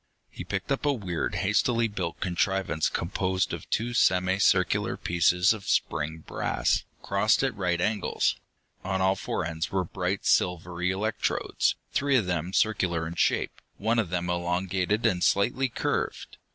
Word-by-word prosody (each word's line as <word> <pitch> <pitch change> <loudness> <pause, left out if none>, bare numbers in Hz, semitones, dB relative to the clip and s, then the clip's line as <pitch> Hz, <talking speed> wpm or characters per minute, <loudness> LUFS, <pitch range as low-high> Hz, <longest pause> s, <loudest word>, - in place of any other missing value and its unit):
He - - -7
picked - - -4
up 135 - 0
a 145 - +3
weird, 95 -9 -3
hastily 115 +4 +2
built 95 -6 -4
contrivance 90 -3 0
composed 95 +2 -1
of - - -7
two 120 +2 -1
semi 95 -3 +3
circular 90 -2 +2
pieces 90 +3 +3
of 110 -3 -9
spring 80 +1 -1
brass, - - 0 0.2
crossed 100 +6 +2
at 130 -5 0
right 90 -3 0
angles. 105 +3 0 0.5
On 95 0 -1
all 95 +1 +3
four 95 - -3
ends 80 -1 -3
were 95 -1 +1
bright 90 +2 -3
silvery 90 0 +1
electrodes, 105 +3 0 0.2
three 140 0 +2
of 115 -6 +3
them 90 -1 -2
circular 95 -6 +1
in 80 - -5
shape, 85 - 0 0.2
one 115 +3 +1
of 105 -7 0
them 90 0 -2
elongated 90 +4 -1
and 95 -6 +2
slightly 125 +6 +2
curved. - - -3
95 Hz, 150 wpm, -27 LUFS, 90-105 Hz, 0.5 s, a